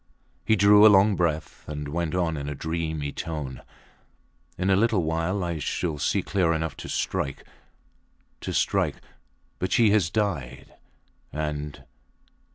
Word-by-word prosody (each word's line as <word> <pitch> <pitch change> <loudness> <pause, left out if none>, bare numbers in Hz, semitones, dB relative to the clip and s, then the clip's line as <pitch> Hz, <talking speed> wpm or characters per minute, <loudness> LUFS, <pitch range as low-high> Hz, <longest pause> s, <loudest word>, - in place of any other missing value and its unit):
He 110 - +3
drew 105 +1 +6
a 110 - +10
long 100 0 +5
breath 80 -3 -2
and 75 -1 -4
went 85 +2 -2
on 85 -3 0
in 70 -1 -4
a 75 - -4
dreamy 80 -2 -3
tone: 75 -6 -5 1.0
In 95 +2 +1
a - - +5
little 105 -2 +2
while 85 +4 -1
I 85 -2 -2
shall 75 +1 -2
see - - +1
clear 90 -4 +1
enough 80 0 -2
to - - -8
strike 70 - -2 0.9
to - - -5
strike. - - +1 0.6
But 95 - -2
she 115 -3 +4
has 100 -5 +3
died, 85 - -3 0.6
and 75 -1 -4
80 Hz, 145 wpm, -26 LUFS, 75-95 Hz, 1.0 s, a